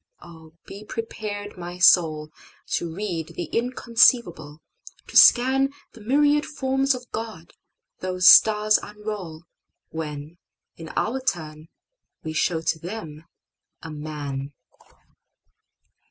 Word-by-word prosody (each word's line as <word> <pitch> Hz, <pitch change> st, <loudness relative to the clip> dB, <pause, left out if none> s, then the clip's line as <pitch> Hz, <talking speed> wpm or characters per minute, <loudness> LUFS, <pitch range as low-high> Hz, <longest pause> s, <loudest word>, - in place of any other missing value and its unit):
O, 160 Hz, -2 st, -15 dB
be 200 Hz, +2 st, -10 dB
prepared, 210 Hz, -3 st, -6 dB
my 175 Hz, 0 st, -7 dB
soul! 155 Hz, -4 st, +4 dB, 0.4 s
To 170 Hz, -, -2 dB
read 170 Hz, -3 st, -5 dB
the -, -, -3 dB
inconceivable, 230 Hz, -, +1 dB, 0.5 s
to -, -, -14 dB
scanThe 265 Hz, +2 st, +6 dB, 0.3 s
myriad 290 Hz, +5 st, +2 dB
forms 270 Hz, -1 st, -1 dB
of 245 Hz, -1 st, -11 dB
God 220 Hz, -7 st, -7 dB, 0.5 s
those 185 Hz, -1 st, 0 dB
stars 215 Hz, -1 st, +6 dB
unrollWhen, 165 Hz, -6 st, -9 dB, 0.4 s
in 165 Hz, -1 st, -10 dB
our 260 Hz, +4 st, -1 dB
turn, 155 Hz, -9 st, -4 dB, 0.6 s
we 160 Hz, -1 st, -5 dB
show 160 Hz, +1 st, 0 dB
to 160 Hz, 0 st, -1 dB
them 165 Hz, -4 st, -8 dB, 0.6 s
a 165 Hz, -, -8 dB
Man. 145 Hz, -2 st, -6 dB
180 Hz, 100 wpm, -23 LUFS, 160-225 Hz, 0.6 s, scanThe